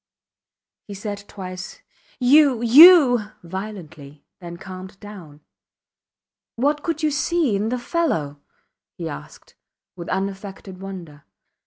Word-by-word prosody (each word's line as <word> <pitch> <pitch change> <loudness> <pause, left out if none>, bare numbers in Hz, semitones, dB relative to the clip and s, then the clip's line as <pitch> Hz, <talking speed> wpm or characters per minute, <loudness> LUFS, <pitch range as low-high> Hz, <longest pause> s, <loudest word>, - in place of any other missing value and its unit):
He 200 - -8
said 205 0 -6
twice, 185 0 -9 0.4
You! 265 -1 +4
You! 260 - +8 0.2
violently, 165 -6 -9
then 170 -2 -9
calmed 185 +1 -10
down. 180 -8 -12 1.1
What 290 +5 0
could 325 -1 -3
you 305 - +2
see 300 - 0
in 210 +3 -1
the 250 - -2
fellow? 240 - -2 0.6
he - - -6
asked, 70 - -10 0.4
with 170 -2 -8
unaffected 195 0 -5
wonder. 175 -7 -9
200 Hz, 110 wpm, -22 LUFS, 180-250 Hz, 1.1 s, You